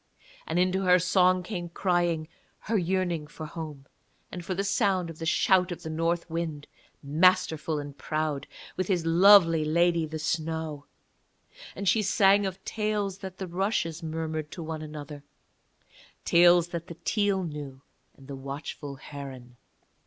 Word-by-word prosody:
And 160 - -1
into 185 +1 +2
her 180 -1 +5
song 185 0 +3
came 175 -3 -5
crying 175 -3 0 0.3
her 225 - -2
yearning 175 -4 0
for 155 +1 -8
home, 150 -3 -8 0.5
and 180 - -6
for 185 +2 -3
the 195 - -1
sound 195 -4 +1
of 160 - -14
the 165 - -3
shout 185 +1 +3
of 175 - -6
the 160 - -5
North 165 +2 -1
Wind, 160 -3 -4 0.4
masterful 160 0 +2
and 145 -1 -6
proud, 150 0 -2 0.3
with 185 - -2
his 180 -4 0
lovely 165 -1 +6
lady 170 +1 +2
the 155 +1 -5
Snow; 155 -1 -3 0.9
and 200 - -4
she 220 - +4
sang 200 0 +4
of 190 0 -8
tales 210 -3 -2
that 190 -1 -8
the 190 - -4
rushes 180 -2 -1
murmured 160 -1 -4
to 170 - -6
one 160 -1 -5
another, 150 -2 -8 1.0
tales 175 0 +5
that 170 -1 -5
the 170 - -9
teal 200 -3 +1
knew 145 -4 -7 0.3
and 135 - -16
the 140 - -6
watchful 140 +1 -7
heron. 135 -3 -9
165 Hz, 155 wpm, -27 LUFS, 155-185 Hz, 1.0 s, lovely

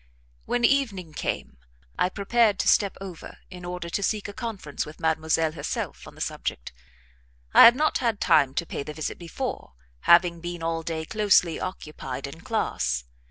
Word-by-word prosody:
When 245 -1 +1
evening 215 - +1
came 65 - -4 0.4
I 180 - +2
prepared 210 +2 +2
to - - -1
step 200 -2 +3
over 190 -4 -9
in 180 -1 -9
order 180 -1 -5
to 200 - -1
seek 210 +1 -1
a 205 - -7
conference 210 - -4
with 150 - -11
Mademoiselle 160 0 +1
herself 150 -2 -5
on - - -13
the - - -11
subject; - - -4 0.8
I - - +10
had 235 - +9
not 305 +3 +1
had 230 -5 0
time 140 -3 +3
to 170 - 0
pay - - -5
the 150 +1 -7
visit 155 - -4
before, 165 - -5 0.4
having 170 -1 +6
been 175 -1 -5
all 165 0 -1
day 160 -1 -4
closely 195 -5 +3
occupied 150 -7 -6
in 140 +4 -9
class. 65 - -1
175 Hz, 170 wpm, -26 LUFS, 155-205 Hz, 0.8 s, I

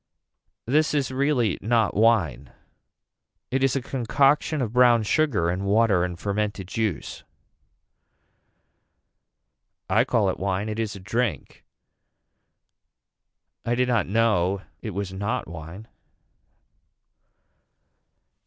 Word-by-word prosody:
This 150 +4 +2
is 140 -3 0
really 130 -6 +1
not 115 0 +1
wine. 105 - +2 1.0
It 135 +1 0
is 135 -1 +2
a 135 - -1
concoction 135 +5 +1
of 120 -4 -2
brown 120 -2 +5
sugar 105 - +1
and 90 +2 -3
water 100 -2 +3
and 90 -1 -4
fermented 105 -1 -2
juice. 110 -5 -3 2.6
I - - +3
call - - +1
it - - -8
wine 95 +2 -2
it 110 +1 -4
is 110 -2 -2
a - - -9
drink. 115 +4 -3 2.0
I 120 - 0
did 125 +1 +1
not 120 -4 +1
know 100 -3 +1 0.2
it 110 -5 -6
was 100 -2 -4
not 105 +6 -3
wine. 85 +6 -9
110 Hz, 105 wpm, -24 LUFS, 100-125 Hz, 2.6 s, brown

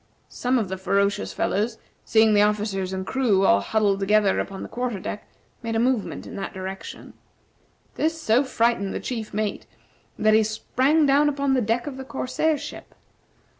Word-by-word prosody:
Some 250 +1 0
of 220 -5 0
the 190 0 -5
ferocious 200 +2 0
fellows, 220 +3 -1 0.3
seeing 220 -1 +4
the 205 - +5
officers 205 -3 0
and 190 0 -4
crew 215 -6 +2
all 100 0 +5
huddled 200 - +1
together 205 0 +3
upon 195 -1 -4
the - - -6
quarter 245 -4 -3
deck, 205 - -6 0.3
made 230 -1 -3
a - - +2
movement 245 -2 0
in - - -9
that 195 0 -5
direction. 190 +1 -7 0.8
This 325 +1 -1
so 240 -2 +3
frightened 230 -6 0
the - - -2
chief 225 -4 -5
mate 210 0 -3 0.5
that 215 0 +3
he 220 - +6
sprang 260 +8 +1
down 285 +2 +4
upon 280 -1 0
the 255 - +2
deck 230 +2 0
of 275 -3 -6
the 265 - -6
corsair 265 +4 -1
ship. - - -9
220 Hz, 175 wpm, -24 LUFS, 200-255 Hz, 0.8 s, he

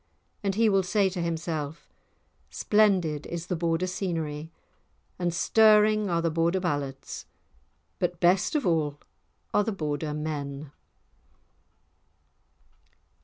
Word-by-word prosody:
And 195 -1 0
he 225 +1 +4
will 195 -2 +4
say 195 +1 +2
to 180 -1 -4
himself: 160 -2 -3 0.6
Splendid 185 -8 +2
is 170 -1 -5
the 180 - -2
Border 165 +1 0
scenery, 165 -4 -3 0.7
and 175 -1 0
stirring 215 +2 +4
are 170 -1 0
the 165 - +1
Border 165 +3 +1
ballads, 145 -6 -4 0.7
but 175 -1 -1
best 180 - +3
of 295 - +1
all 155 -4 +1 0.6
are 205 - +4
the 225 - -1
Border 150 -4 -3
men. 145 -2 -4
170 Hz, 115 wpm, -27 LUFS, 155-195 Hz, 0.7 s, he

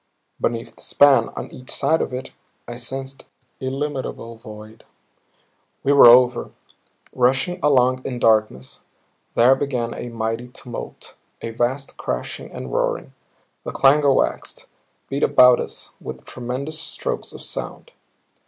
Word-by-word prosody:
Beneath 115 -1 -2
the - - -16
span, 135 -5 +4
on - - -6
each 130 - -11
side 160 - +1
of - - -2
it, 125 +1 -6 0.4
I 120 - -6
sensed 135 +3 -6 0.3
illimitable 130 -3 -4
void. 110 0 -12 1.0
We 140 - +2
were 140 -3 +9
over; 125 +1 +6 0.6
rushing 135 +9 +1
along 130 -3 +3
in 125 - -4
darkness. 110 - +1 0.6
There 125 +3 +6
began 130 -4 -2
a 120 - -6
mighty 115 +1 -3
tumult, 125 -1 -8 0.3
a 115 - -4
vast 125 +4 -2
crashing - - -4
and 65 -2 -7
roaring. - - -1 0.5
The - - -5
clangor 140 +1 +4
waxed, - - -1 0.4
beat 140 +1 -3
about 125 -1 +6
us - - -6
with - - -8
tremendous 130 +6 -5
strokes 485 - -4
of - - -10
sound. 485 - -5
125 Hz, 130 wpm, -22 LUFS, 115-135 Hz, 1.0 s, were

